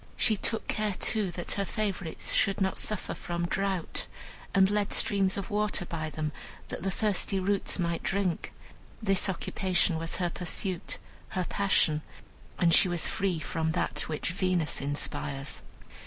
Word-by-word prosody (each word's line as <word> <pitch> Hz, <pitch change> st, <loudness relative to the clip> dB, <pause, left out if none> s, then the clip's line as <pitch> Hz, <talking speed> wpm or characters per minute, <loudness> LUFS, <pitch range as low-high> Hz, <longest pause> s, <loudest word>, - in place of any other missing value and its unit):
She 220 Hz, -, +3 dB
took 225 Hz, +2 st, -1 dB
care, 210 Hz, -2 st, 0 dB
too, 215 Hz, -4 st, +1 dB
that 175 Hz, 0 st, -4 dB
her 200 Hz, -, 0 dB
favorites 195 Hz, -5 st, -2 dB
should 195 Hz, -1 st, +3 dB
not 190 Hz, -1 st, +1 dB
suffer 215 Hz, -2 st, 0 dB
from 175 Hz, 0 st, -3 dB
drought, 190 Hz, -1 st, -2 dB, 0.4 s
and 190 Hz, -1 st, +5 dB
led 205 Hz, 0 st, +1 dB
streams 195 Hz, -2 st, +3 dB
of 200 Hz, +2 st, -4 dB
water 210 Hz, -3 st, +1 dB
by 160 Hz, -2 st, -3 dB
them, 155 Hz, 0 st, -3 dB, 0.4 s
that -, -, -5 dB
the 195 Hz, -, 0 dB
thirsty 195 Hz, -1 st, +1 dB
roots 195 Hz, +1 st, +2 dB
might 170 Hz, -2 st, -1 dB
drink. 190 Hz, -3 st, -1 dB, 0.5 s
This 195 Hz, -3 st, +3 dB
occupation 185 Hz, -2 st, +1 dB
was 165 Hz, 0 st, 0 dB
her 175 Hz, -2 st, -1 dB
pursuit, 180 Hz, 0 st, -2 dB, 0.4 s
her 180 Hz, -, +1 dB
passion; 180 Hz, -6 st, +2 dB, 0.6 s
and 170 Hz, -2 st, +4 dB
she -, -, +7 dB
was 175 Hz, -2 st, +1 dB
free 190 Hz, -3 st, 0 dB
from 160 Hz, +1 st, -1 dB
that -, -, 0 dB
which 155 Hz, +1 st, -2 dB
Venus 180 Hz, -3 st, +1 dB
inspires. 145 Hz, -1 st, -3 dB
185 Hz, 155 wpm, -29 LUFS, 165-200 Hz, 0.6 s, she